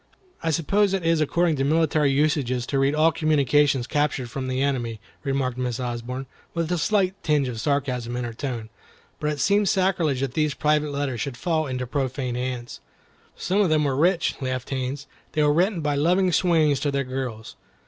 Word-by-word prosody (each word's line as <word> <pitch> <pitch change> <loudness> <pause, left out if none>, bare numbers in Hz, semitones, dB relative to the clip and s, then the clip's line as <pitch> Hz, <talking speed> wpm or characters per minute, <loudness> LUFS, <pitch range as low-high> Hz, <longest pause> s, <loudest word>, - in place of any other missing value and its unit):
"I 165 - -1
suppose 195 +5 +2
it 185 -3 -3
is 165 -1 +3
according 165 +1 +1
to 135 - 0
military 155 0 +2
usages 135 -4 +1
to 135 +1 -1
read 135 +2 +2
all 160 +2 +4
communications 145 -4 +2
captured 145 -4 -1
from 130 0 -4
the 130 0 -1
enemy," 120 -5 -1 0.2
remarked 135 -2 -1
Miss 125 -1 -2
Osborne 125 +1 -4 0.3
with 165 0 -1
a 175 - +1
slight 190 +2 +2
tinge 150 -3 +1
of 115 -3 -4
sarcasm 125 -4 -1
in 125 - -2
her 120 -1 -5
tone, 115 -3 -5 0.5
"but 150 - -1
it 150 - -4
seems 200 +7 +3
sacrilege 180 -8 +1
that 135 -2 -2
these 150 -1 0
private 150 0 +1
letters 140 -4 -2
should 135 -4 -4
fall 160 +1 0
into 125 -1 -3
profane 130 -1 -2
hands." 125 -1 -4 0.6
"Some 195 +3 0
of 195 - +3
them 155 -1 +3
were 140 -2 0
rich," 170 +4 +2
laughed 130 -1 -3
Haines; 135 +1 -3 0.3
"they 155 - +2
were 145 0 +4
written 180 +2 +1
by 150 -1 0
loving 180 +6 +2
swains 160 -5 +3
to 145 - 0
their 140 0 0
girls. 130 -4 -5
140 Hz, 190 wpm, -24 LUFS, 130-160 Hz, 0.6 s, all